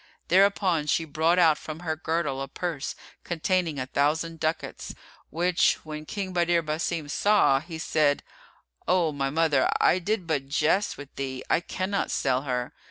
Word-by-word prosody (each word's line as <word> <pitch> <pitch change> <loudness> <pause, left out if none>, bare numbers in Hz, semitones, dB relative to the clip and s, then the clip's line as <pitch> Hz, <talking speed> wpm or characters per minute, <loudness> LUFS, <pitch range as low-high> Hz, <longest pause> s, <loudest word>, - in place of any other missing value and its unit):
Thereupon 185 -4 +3
she 165 +2 +1
brought 160 +3 +1
out 160 -4 +5
from 155 +1 -7
her 160 -2 -2
girdle 160 -4 -2
a 135 - -4
purse 160 0 -4 0.3
containing 175 -1 -1
a 130 - -2
thousand 160 +5 0
ducats, 160 0 -3 0.3
which 175 +2 +2
when 155 0 -7
King 195 -2 -4
Badr 170 -1 +2
Basim 155 0 -2
saw, 195 -4 +3
he 165 +2 -8
said, 150 -2 +1 0.6
"O 180 -3 +3
my 135 -2 -1
mother, 150 -2 +2
I 185 - +4
did 200 +1 -1
but 145 -5 -1
jest 155 +8 +1
with 145 -1 -11
thee; 130 -2 -4
I - - +4
cannot 190 +3 -2
sell 130 -1 +1
her." 125 -3 -3
160 Hz, 160 wpm, -26 LUFS, 145-175 Hz, 0.6 s, out